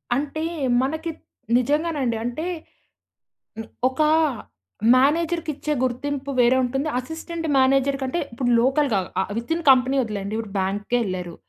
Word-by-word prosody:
అంటే 295 +3 -2 0.4
మనకి 315 +5 -2 0.5
నిజంగానండి 285 -2 0
అంటే 245 +7 -3 1.2
ని 225 - -7 0.2
ఒక 260 +4 -1 0.9
మేనేజర్‌కిచ్చే 305 +2 +1
గుర్తింపు 275 +2 -2
వేరే 245 +1 +5
ఉంటుంది, 270 +4 -1
అసిస్టెంట్ 320 +4 -6
మేనేజర్ 270 +1 +3
కంటే 265 +6 -1
ఇప్పుడు 245 +1 -1
లోకల్‌గా 265 -3 +2 0.2
ఆహ్, 190 - -6
విత్‌ఇన్ 325 +8 -3
కంపెనీ 260 +1 +4
వదిలేయండి. 210 -3 -4
ఇప్పుడు 220 -3 -5
బ్యాంక్‌కేళ్లారు. 190 -2 -2
265 Hz, 110 wpm, -23 LUFS, 240-300 Hz, 1.2 s, వేరే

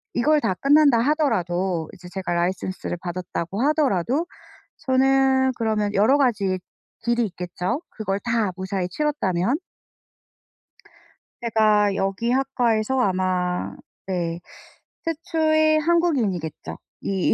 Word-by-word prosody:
이걸 300 +5 +3
다 185 - 0
끝난다 285 -2 +5
하더라도 190 - 0
이제 180 0 -12
제가 185 -1 -4
license를 180 +1 -2
받았다고 180 +2 -4
하더라도 280 - +1 0.5
저는 265 0 +3
그러면 215 -3 0
여러 220 +8 +4
가지 200 -9 +1 0.4
길이 235 0 +1
있겠죠 180 - -4
그걸 200 -3 -3
다 230 -4 0
무사히 190 -1 -3
치렀다면? 240 -4 0 1.8
제가 215 -3 +3
여기 195 +5 -1
학과에서 255 -2 +1
아마 185 -3 0 0.3
네 170 -3 -2 0.7
최초의 315 -1 +2
한국인이겠죠. 275 - 0 0.2
이 190 -2 +1
215 Hz, 260 characters per minute, -23 LUFS, 185-270 Hz, 1.8 s, 끝난다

